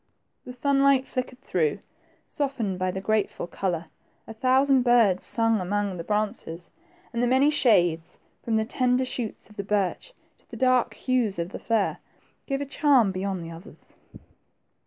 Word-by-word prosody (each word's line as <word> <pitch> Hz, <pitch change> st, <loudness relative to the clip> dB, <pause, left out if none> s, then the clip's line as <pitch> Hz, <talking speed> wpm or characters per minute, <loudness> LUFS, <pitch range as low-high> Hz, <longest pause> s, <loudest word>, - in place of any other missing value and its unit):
The 250 Hz, -, -7 dB
sunlight 275 Hz, +1 st, +2 dB
flickered 255 Hz, 0 st, -5 dB
through, 160 Hz, -, 0 dB, 0.5 s
softened 235 Hz, -10 st, -2 dB
by 185 Hz, 0 st, 0 dB
the 190 Hz, +1 st, -4 dB
grateful 215 Hz, -2 st, -1 dB
color, 175 Hz, -1 st, -3 dB, 0.4 s
a 225 Hz, -, -9 dB
thousand 260 Hz, +3 st, +3 dB
birds 235 Hz, -7 st, +3 dB
sang 225 Hz, -3 st, +2 dB
among 200 Hz, +1 st, -1 dB
the 170 Hz, -, -5 dB
branches, 205 Hz, -5 st, -3 dB, 0.4 s
and 235 Hz, -, -1 dB
the 245 Hz, -, +2 dB
many 265 Hz, +4 st, +4 dB
shades, 175 Hz, -, +2 dB, 0.3 s
from 225 Hz, -, -1 dB
the 220 Hz, 0 st, +1 dB
tender 250 Hz, +2 st, +1 dB
shoots 245 Hz, -3 st, -4 dB
of 210 Hz, -, -16 dB
the 200 Hz, -, -3 dB
birch 205 Hz, -, -1 dB, 0.3 s
to -, -, -28 dB
the -, -, -9 dB
dark 255 Hz, -1 st, +2 dB
hues 245 Hz, -7 st, 0 dB
of 170 Hz, +1 st, -3 dB
the -, -, -8 dB
fir, 225 Hz, -4 st, 0 dB, 0.5 s
gave 275 Hz, -1 st, -2 dB
a -, -, -2 dB
charm 275 Hz, -7 st, +3 dB
beyond 190 Hz, -1 st, -3 dB
the 165 Hz, -, -8 dB
others. 165 Hz, +5 st, -12 dB
225 Hz, 160 wpm, -25 LUFS, 190-255 Hz, 0.5 s, many